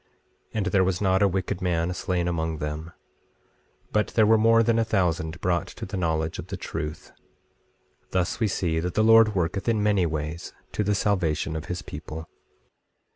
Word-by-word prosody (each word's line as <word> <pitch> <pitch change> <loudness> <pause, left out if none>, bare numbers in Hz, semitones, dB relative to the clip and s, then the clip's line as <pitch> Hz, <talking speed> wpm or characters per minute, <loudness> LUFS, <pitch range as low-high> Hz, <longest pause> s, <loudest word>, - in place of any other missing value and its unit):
24:27 - - -40 0.5
And 105 -3 0
there 95 0 +3
was 90 -1 0
not 95 -1 +2
a 100 - +6
wicked 95 -1 -2
man 90 -1 0
slain 90 -1 -1
among 80 -2 -1
them; 75 +3 -5 1.0
but 105 0 +2
there 110 - +5
were 110 +1 +6
more 115 +1 +5
than 115 0 +2
a - - +3
thousand 90 -6 0
brought 85 -3 0
to - - -8
the 95 - -6
knowledge 80 -3 -1
of - - -7
the - - -5
truth; 75 +1 -5 1.0
thus 90 0 -1
we 110 - +2
see 85 -4 0
that 90 +1 -3
the 110 - +3
Lord 115 -1 +6
worketh 95 +5 0
in 110 -2 +1
many 100 -4 +3
ways 80 +1 -4 0.2
to 105 - -1
the 105 0 +1
salvation 85 -6 0
of 80 +1 -4
his 90 0 -4
people. 80 +1 -8
90 Hz, 185 wpm, -26 LUFS, 80-105 Hz, 1.0 s, a